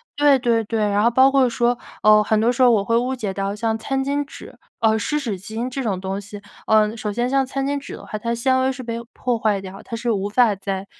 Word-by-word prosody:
对 290 -2 +5
对 235 -3 +1
对， 225 +1 -3
然 205 +1 +2
后 235 - +5
包 260 +3 +5
括 270 -2 +3
说， 240 +1 +1 0.3
呃， 215 0 +7
很 215 0 +1
多 230 +3 +3
时 250 - -2
候 250 - +7
我 210 -4 +2
会 230 - +1
误 250 +3 0
解 210 -6 -4
到 195 +1 -3
像 220 +1 -1
餐 270 +4 -2
巾 285 +1 0
纸 - - -12 0.2
呃， 220 -2 +2
湿 300 +8 -1
纸 225 -9 -4
巾 220 +5 -5
这 270 - -3
种 205 -7 -2
东 190 +1 -4
西。 205 +1 -10 0.3
呃， 215 0 +3
首 215 -2 -4
先 240 +4 -1
像 270 +1 +2
餐 270 +1 -3
巾 285 +1 -1
纸 280 - -10
的 - - -12
话， - - -15
它 230 - -4
的 235 - 0
纤 260 +2 +1
维 260 +1 +1
是 255 0 -7
被 230 -1 -4
破 245 -2 -2
坏 210 -3 +1
掉， 190 0 -9
它 230 - -6
是 235 +1 -1
无 200 -1 -1
法 230 0 +3
再 195 0 -4
230 Hz, 290 characters per minute, -21 LUFS, 210-260 Hz, 0.3 s, 呃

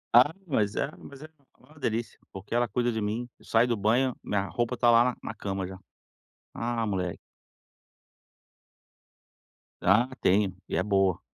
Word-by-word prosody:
Ah, 125 +5 +8
mas 110 - 0
é 135 - -1
mas 140 +1 -12
é 155 - -10 0.3
uma 155 0 -20
delícia, 115 -3 -2
porque 95 +3 -8
ela 120 0 +2
cuida 120 +3 0
de 110 -1 -2
mim. 110 +4 -2
Eu - - -20
saio 115 +2 +3
do 120 - +1
banho, 115 +5 +2
minha 100 -1 -1
roupa 120 +3 -2
tá 120 -1 +5
lá 120 +1 +4
na - - -5
cama 95 -1 -3
já. 95 +1 -7 0.8
Ah, 115 0 -2
mole 95 -4 -2 2.6
Ah, 110 +7 +4
tenho, 95 0 +3
e - - -3
é 85 - +2
boa. 95 -3 +2
115 Hz, 160 wpm, -28 LUFS, 100-120 Hz, 2.6 s, Ah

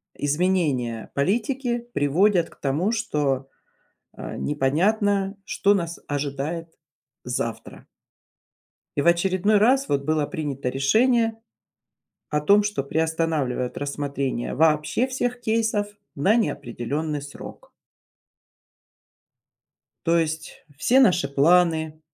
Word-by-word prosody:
изменения 145 -7 0
политики 240 - -1
приводят 170 +5 +2
к - - -19
тому, 150 +10 0
что, 145 - -1 0.7
а, - - -7
непонятно, 195 +8 +1
что 200 +1 +2
нас 170 -3 -2
ожидает 145 +4 -3 0.5
завтра. 120 -2 -5 1.1
И 140 - +2
в - - -3
очередной 185 +4 +3
раз 265 +6 +3
вот 140 -1 0
было 155 -1 +1
принято 140 -4 -4
решение 225 - +2 0.9
о 150 0 0
том, 200 +7 +5
что 205 -9 -2
приостанавливает 160 -5 -1
рассмотрение 140 -3 -3
вообще 155 - +2
всех 250 -1 -2
кейсов 220 -2 0 0.3
на 195 +11 +3
неопределенный 145 - -2
срок. 145 - -11 2.4
То 170 0 +3
есть 160 -1 -3
все 255 - +4
наши 180 - +4
планы, 160 +1 +2
160 Hz, 100 wpm, -24 LUFS, 140-205 Hz, 2.4 s, том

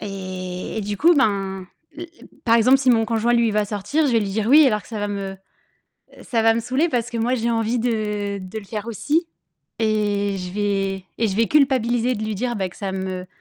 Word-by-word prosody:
et 185 -1 -5
et - - -1
du 205 0 -3
coup 340 - +5
ben, 195 - 0 0.3
l 340 - -7 0.2
l - - -15 0.2
par 230 -1 +5
exemple 255 +4 +5
si 260 -2 +3
mon 225 -2 +3
conjoint, 230 +1 +1
lui, 235 -1 +3
il 215 - -1
va 210 0 +1
sortir, 210 +10 -1
je 265 - +1
vais 230 - +3
lui 200 -2 -2
dire 215 +1 -1
«oui», 295 +2 +7
alors 210 -4 +1
que - - -18
ça 225 - -5
va 205 0 -2
me 195 -1 -4 0.9
ça 230 - -1
va 225 0 +5
me 230 - 0
saouler. 260 +8 0
Parce 240 -4 -1
que 235 - -4
moi 235 +3 +1
j'ai 235 -1 -1
envie 230 +1 0
de 210 -4 -2
de 185 +3 -7
le 215 - -10
faire 210 +1 -6
aussi 295 - 0 0.5
et 205 -2 0
je 180 0 -6
vais 195 -2 -1
et 225 - +2
je 190 - -3
vais 230 +1 +3
culpabiliser 255 -4 +2
de 215 -1 -4
lui 215 - -3
dire, 240 +3 -2
bah, 190 -2 -1
que 175 - -17
ça 195 -2 -4
me 190 -1 -4
220 Hz, 240 wpm, -22 LUFS, 200-235 Hz, 0.9 s, oui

